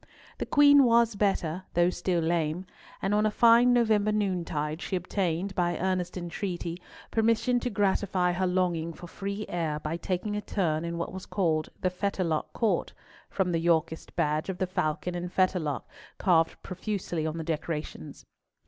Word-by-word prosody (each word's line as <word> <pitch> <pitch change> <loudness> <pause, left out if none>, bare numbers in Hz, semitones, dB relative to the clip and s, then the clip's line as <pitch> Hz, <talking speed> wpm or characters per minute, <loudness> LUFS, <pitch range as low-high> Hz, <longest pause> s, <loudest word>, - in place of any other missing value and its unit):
The - - -3
Queen 285 -1 +7
was 235 -2 +4
better, 190 -4 0
though 175 +1 +4
still 180 -2 0
lame; 165 +1 0 0.4
and 195 +2 +1
on 210 0 +3
a 215 - +3
fine 235 +3 +6
November 220 -3 +3
noontide 170 -6 -1
she 195 - -3
obtained, 180 0 -1
by 175 -1 0
earnest 185 -1 -1
entreaty, 175 0 -4 0.3
permission 230 +2 +2
to 250 - -2
gratify 195 -3 +1
her 185 +1 0
longing 175 -3 0
for 175 - -11
free 200 +4 -5
air 160 -4 -2
by 155 +2 -3
taking 185 +4 -2
a 210 - -2
turn 165 -6 -1
in 170 0 -3
what 170 - -4
was 190 0 -7
called 160 -5 0
the 185 - +1
Fetterlock 180 -4 -1
Court, 225 - 0 0.4
from 190 -3 0
the 165 - +1
Yorkist 165 -1 0
badge 150 +4 0
of 190 - -3
the 185 - 0
falcon 170 -1 -2
and 175 0 -4
fetterlock 180 -7 0 0.3
carved 165 -4 +2
profusely 185 -4 -3
on 160 +1 -3
the 165 - -3
decorations. 155 - -5
180 Hz, 165 wpm, -28 LUFS, 165-200 Hz, 0.4 s, Queen